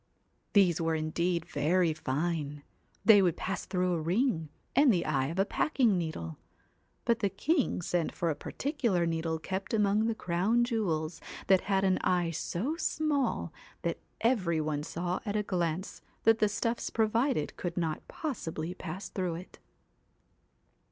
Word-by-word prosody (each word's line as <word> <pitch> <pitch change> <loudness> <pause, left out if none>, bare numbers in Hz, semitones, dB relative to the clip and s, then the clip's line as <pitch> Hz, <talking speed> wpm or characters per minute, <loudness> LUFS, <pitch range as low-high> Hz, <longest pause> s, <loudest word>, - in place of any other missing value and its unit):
These 185 -5 +4
were 165 0 +1
indeed 170 +2 0
very 170 +1 +2
fine; 150 0 -2 0.4
they 210 -3 +8
would 175 -4 +2
pass 195 - -3
through 180 -1 +1
a 165 - -1
ring, 170 - +1 0.3
and 280 0 +6
the 175 -5 +1
eye 135 -3 +1
of 165 +5 -5
a 195 - +3
packing 245 -4 +2
needle: 160 - -4 0.7
but 235 -1 +2
the 200 - +1
king 275 - 0
sent 170 -1 0
for 170 -1 -1
a - - -2
particular 235 - -1
needle 165 -1 -1
kept 190 +6 -3
among 210 +1 +3
the 230 - 0
Crown 195 +7 +1
jewels 180 -10 -1 0.2
that 190 -1 +5
had 195 -1 +1
an 190 -1 +3
eye 175 -2 +1
so 200 - -2
small, 300 -5 0 0.3
that - - -1 0.2
every 190 -9 +2
one 150 -1 -1
saw 175 +4 -2
at 205 -2 -3
a 210 - +1
glance 175 -1 -2 0.2
that 225 0 +5
the 210 - +3
stuffs 230 +3 -1
pro 220 -1 +2
vided 230 - 0
could 175 0 -4
not 160 -3 -2
possibly 175 - -4
pass 185 +1 -6
through 180 -3 -2
it. 180 +3 -10
180 Hz, 160 wpm, -30 LUFS, 165-220 Hz, 0.7 s, they